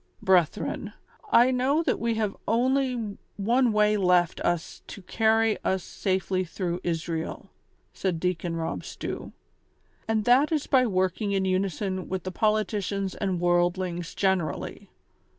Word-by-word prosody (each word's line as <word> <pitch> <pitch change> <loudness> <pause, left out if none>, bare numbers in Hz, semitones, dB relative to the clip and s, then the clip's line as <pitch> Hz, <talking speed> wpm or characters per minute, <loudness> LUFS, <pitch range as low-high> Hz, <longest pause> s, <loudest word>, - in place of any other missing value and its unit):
" - - -38
Brethren, 180 -4 +1 0.4
I 245 +2 +6
know 265 +5 +2
that - - 0
we 230 -1 0
have 215 -2 -1
only 245 -3 0 0.2
one 240 +6 +2
Avay 210 -1 +3
left 180 -3 +2
us 175 -1 -2
to 200 - -9
carry 225 +2 +2
us 190 -1 0
safely 185 -1 -1
through 180 0 -4
Israel," 165 -1 -3 0.4
said 180 -4 -2
Deacon 175 -1 -1
Rob 165 -1 -3
Stew; - - -6 0.8
"and 220 -1 0
that 265 +6 +4
is 305 -3 0
by 255 -3 +3
working 190 +1 0
in 190 -1 +1
unison 190 0 -1
with 185 -2 -3
the 185 - -4
politicians 205 -1 0
and 190 -3 -2
worldlings 175 0 0
generally. 190 -5 -1
195 Hz, 135 wpm, -26 LUFS, 180-225 Hz, 0.8 s, I